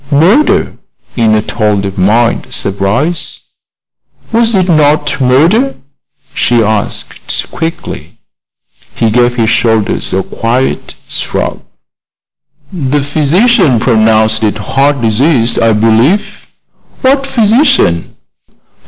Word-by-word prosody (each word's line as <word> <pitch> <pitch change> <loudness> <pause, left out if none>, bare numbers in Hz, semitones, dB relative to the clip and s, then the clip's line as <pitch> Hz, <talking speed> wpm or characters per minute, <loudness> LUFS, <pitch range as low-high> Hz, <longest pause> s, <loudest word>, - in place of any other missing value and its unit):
"Murder?" 180 - +2 0.4
in 110 -3 +2
a 105 - 0
tone 105 -3 -1
of 95 -1 -5
mild 110 +5 0
surprise. 115 - -3 0.9
"Was 230 -1 +1
it 185 -1 +1
not 150 -3 +1
murder?" 165 - +2 0.6
she 120 -5 +1
asked, 110 -1 -3
quickly. 165 0 -6 0.8
He 115 -2 0
gave 120 +1 +2
his 115 -2 +1
shoulders 110 -3 0
a 95 0 -1
quiet 120 +7 -2
shrug. - - -4 1.1
"The 145 -4 -1
physician 155 - +2
pronounced 110 -2 +2
it 105 -1 0
heart 135 +6 0
disease, 115 +1 +1
I 115 -1 +2
believe." 115 - +1 0.6
"What 270 +1 +2
physician?" 225 - +1
125 Hz, 100 wpm, -10 LUFS, 110-165 Hz, 1.1 s, Murder